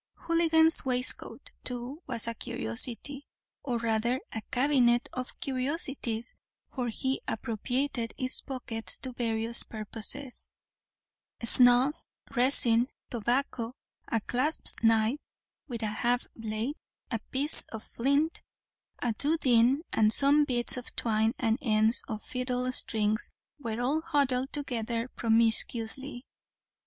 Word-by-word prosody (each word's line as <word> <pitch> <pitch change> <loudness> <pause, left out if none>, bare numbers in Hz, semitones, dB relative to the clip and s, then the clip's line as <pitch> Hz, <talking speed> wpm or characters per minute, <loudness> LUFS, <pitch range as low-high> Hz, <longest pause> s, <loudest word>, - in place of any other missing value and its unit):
Houligan's 325 -1 +3
waistcoat, 250 -1 -1
too, 250 +5 -6
was 235 -3 +1
a 230 - -4
curiosity, 235 - +1 0.3
or 250 -4 -4
rather, 230 +2 -2
a 220 - -6
cabinet 250 -2 0
of 255 0 -7
curiosities; 260 -4 -1 0.3
for 250 -3 -7
he 260 +4 -3
appropriated 235 +2 -4
its 255 0 +2
pockets 235 -4 -1
to 260 - -3
various 230 -1 +3
purposes; 225 +5 +3 0.9
snuff, 245 +4 +6 0.3
resin, 245 -2 +6 0.2
tobacco, 240 +1 -4 0.3
a 230 - -2
clasp 260 +9 0
knife 225 +4 +1 0.5
with 235 -4 -8
half 235 +3 -3
a - - -30
blade, 225 +6 -5 0.3
a 230 - -3
piece 285 +4 +7
of 220 -1 -10
flint, 280 +6 -2 0.6
a 240 -2 -2
doodeen, 270 0 0
and 215 -1 +1
some 285 +4 +4
bits 245 -2 +1
of 250 - -8
twine 220 0 -1
and 225 0 -2
ends 220 -1 +2
of 215 -4 -7
fiddle 250 -1 -4
strings 220 -3 +1 0.3
were 230 -4 -6
all 275 +6 -2
huddled 270 -3 -2
together 235 -4 -5
promiscuously. 230 +3 0
245 Hz, 115 wpm, -26 LUFS, 225-270 Hz, 0.9 s, piece